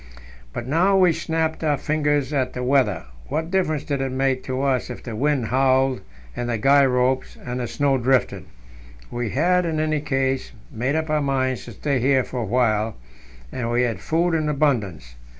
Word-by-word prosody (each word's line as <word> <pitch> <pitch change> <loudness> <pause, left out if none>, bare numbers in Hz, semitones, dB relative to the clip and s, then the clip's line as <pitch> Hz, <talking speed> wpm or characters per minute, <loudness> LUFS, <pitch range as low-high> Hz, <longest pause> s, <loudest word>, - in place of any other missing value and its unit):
But 115 - -5
now 180 +7 +3
we 180 -3 +5
snapped 160 0 -2
our 150 -2 +2
fingers 150 -1 0
at 130 -3 0
the 125 - -4
weather; 125 - +2 0.2
what 160 - -3
difference 155 -6 0
did 140 -3 -2
it 135 -1 -2
make 130 0 0
to 130 +1 -2
us 130 -3 0
if 125 - -8
the 115 -3 -6
wind 135 -2 0
howled 130 0 +2 0.3
in 120 - -3
the 120 -1 -1
guy 140 +5 +5
ropes 130 +1 0
and 125 0 -3
the 120 - -2
snow 140 0 +1
drifted? 130 +1 +1 0.7
We 120 -2 -3
had, 180 - +2
in 160 -2 -1
any 155 -1 0
case, 135 -3 -1 0.2
made 125 +6 -1
up 160 -1 -1
our 155 -1 +2
minds 130 -2 -1
to 120 - -9
stay 140 +5 -1
here 130 +1 +3
for 125 - -5
a - - -2
while, 110 -1 +1 0.6
and 120 -2 -3
we 120 +1 +2
had 120 -2 -1
food 170 +2 0
in 155 -2 0
abundance. 110 - -1
135 Hz, 190 wpm, -22 LUFS, 125-150 Hz, 0.7 s, we